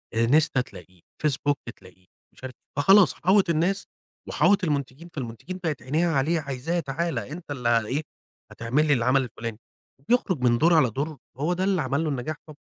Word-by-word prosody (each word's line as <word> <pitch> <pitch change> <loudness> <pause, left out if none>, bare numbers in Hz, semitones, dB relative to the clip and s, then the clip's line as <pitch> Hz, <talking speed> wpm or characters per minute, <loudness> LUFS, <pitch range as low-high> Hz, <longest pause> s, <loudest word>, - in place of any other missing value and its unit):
انستا 135 +4 +3
تلاقيه 90 -6 -13 0.2
facebook 145 0 +1 0.2
تلاقيه 90 0 -19 0.3
مش - - -21
عارف 130 -1 -6 0.2
فخلاص 195 +7 +6
حاوط 190 0 +2
الناس 175 +5 +1 0.4
وحاوط 200 -1 +3
المنتجين 145 +1 -3
فالمنتجين 135 +8 -6
بقت 155 -6 -2
عينيها 160 +6 +1
عليه، 155 +5 +1
عايزاه 140 +4 -3
تعالَ 155 -1 -2
أنت 150 - -8
اللي 120 -4 +1
إيه 140 +4 -1 0.5
هتعمل 125 +7 0
لي 145 - +4
العَمل 130 +2 +2
الفُلاني، 115 -2 -6 0.5
بيخرج 210 - +2
من 120 -1 +3
دور 165 +6 +4
على 150 -6 +4
دور 145 +6 -4 0.2
هو 155 +5 0
ده 180 +1 -2
اللي 190 -3 +1
عمل 140 +3 -1
له 160 - -1
النجاح 140 +2 -3
طبع 155 - -11
145 Hz, 170 wpm, -25 LUFS, 125-170 Hz, 0.5 s, فخلاص